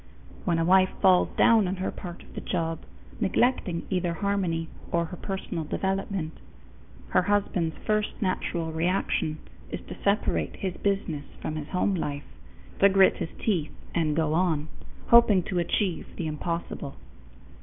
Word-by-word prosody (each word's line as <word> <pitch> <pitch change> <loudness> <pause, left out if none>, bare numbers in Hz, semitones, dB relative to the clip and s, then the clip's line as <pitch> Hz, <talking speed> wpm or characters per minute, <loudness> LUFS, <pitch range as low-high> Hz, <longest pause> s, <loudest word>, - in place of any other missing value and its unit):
When 170 -3 +2
a 165 - +1
wife 185 +1 +5
falls 185 -2 +5
down 225 -4 +5
on 185 - -1
her 185 0 -2
part 175 -1 -8
of - - -17
the - - -5
job, 165 -2 -2 0.4
neglecting 195 -9 +1
either 180 -2 0
harmony 180 -4 0 0.2
or 170 0 +2
her 165 - -7
personal 190 -3 -4
development, 190 0 -2 0.7
her - - +4
husband's 180 -4 0
first 215 0 0
natural 175 -5 -1
reaction 160 -2 0 0.3
is - - -4
to - - -10
separate 200 +1 +1
his 190 -2 -3
business 185 -7 -1
from 155 - -4
his 150 -1 -5
home 185 +3 +1
life 145 -5 -2 0.6
to 200 - +7
grit 195 0 +5
his - - -3
teeth 175 -9 0 0.2
and 155 -3 +1
go 155 -1 +1
on, 160 -3 +1 0.4
hoping 220 -6 +7
to 180 0 -1
achieve 175 0 0
the 170 - -3
impossible. 155 -2 -4
180 Hz, 150 wpm, -27 LUFS, 160-195 Hz, 0.7 s, to